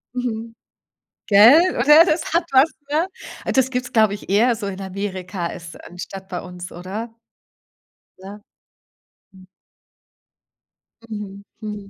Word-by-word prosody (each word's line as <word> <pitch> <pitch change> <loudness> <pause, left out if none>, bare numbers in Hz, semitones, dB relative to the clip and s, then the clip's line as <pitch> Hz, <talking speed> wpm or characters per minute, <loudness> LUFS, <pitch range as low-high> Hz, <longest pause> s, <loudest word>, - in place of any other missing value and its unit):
Mhm. 230 -2 -4 0.7
Gell, 245 - +6
oder, 300 +6 +7
das 315 -2 0
hat 340 0 +3
was, 270 +4 +5 0.2
ne? 325 +5 +1 0.5
Das 265 -1 +2
gibt 250 -1 -2
es, - - -11
glaube 215 -3 +4
ich, 205 - -9
eher 230 +5 +3
so 205 -2 -5
in 195 0 -6
Amerika 185 -2 -5
als 170 0 -9
anstatt 190 +2 -9
bei 180 -2 -5
uns, 180 -1 -9
oder? 210 +6 -7 1.0
Ja. 200 +2 -11 0.9
Mhm. 185 -1 -17 1.6
Mhm, 200 -2 -7 0.2
mhm. 210 -2 -7
210 Hz, 125 wpm, -21 LUFS, 190-250 Hz, 1.6 s, oder